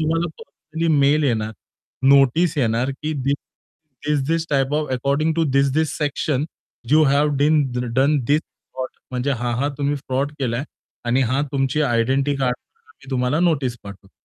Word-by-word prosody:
तुम्हाला 165 +2 +1
personally 160 +2 -5
mail 145 +2 +3
येणार, 110 -4 0 0.6
notice 140 +4 +4
येणार, 120 +2 +1
की 155 +3 -4
दि 140 -1 -1 0.8
this this 155 +3 0
type 135 -1 +1
of, 155 0 0
according 140 +5 +1
to 165 - +2
this this 140 +3 +2
section, 145 -1 -1 0.5
you 155 +1 +6
have 145 +1 +3
bin 150 0 +4 0.3
done 140 +3 +3
the 125 - -4
this 150 +2 +3
fraud. 130 0 -8 0.2
म्हणजे 125 +2 -1
हां, 120 -1 -2
हां 145 +1 +1
तुम्ही 145 0 0
फ्रॉड 135 +2 -2
केलाय 125 +2 -1 0.4
आणि 125 +3 +2
हां, 130 +4 +1
तुमची 135 +2 0
आयडेंटिटी 135 +3 +1
कार्डवरती 135 +1 -5
तुम्हाला 130 +4 +1
नोटीस 140 -8 +1
पाठवतो. 100 -1 -12
140 Hz, 150 wpm, -21 LUFS, 130-150 Hz, 0.8 s, you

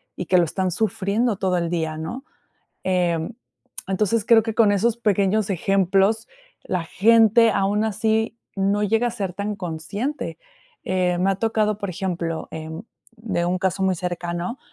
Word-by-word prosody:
y 180 - -4
que 185 - +4
lo 175 - +5
están 185 +3 -1
sufriendo 215 +2 0
todo 185 -2 0
el 170 -1 -1
día, 160 -2 -2
¿no?, 235 - -6 0.6
em, 175 0 0 0.5
entonces 210 +3 +1
creo 225 -2 +6
que 225 -2 -3
con 215 -3 +5
esos 225 +3 +1
pequeños 210 -1 +1
ejemplos, 195 +3 +2 0.4
la 180 -3 -2
gente, 225 +4 +5
aún 205 +2 +1
así 220 +1 0 0.2
no 200 +2 +1
llega 225 +4 +2
a 235 - -2
ser 195 -5 -4
tan 205 +2 -3
consciente, 200 - -4 0.5
eh, 180 -1 0
me 195 +2 +2
ha - - -1
tocado, 215 0 0
por 200 -2 -3
ejemplo, 170 -2 -3
em, 160 +4 -7 0.3
de 190 -6 -2
un 180 +1 0
caso 190 0 -1
muy 190 -1 +2
cercano. 175 +5 -4
195 Hz, 160 wpm, -23 LUFS, 180-220 Hz, 0.6 s, creo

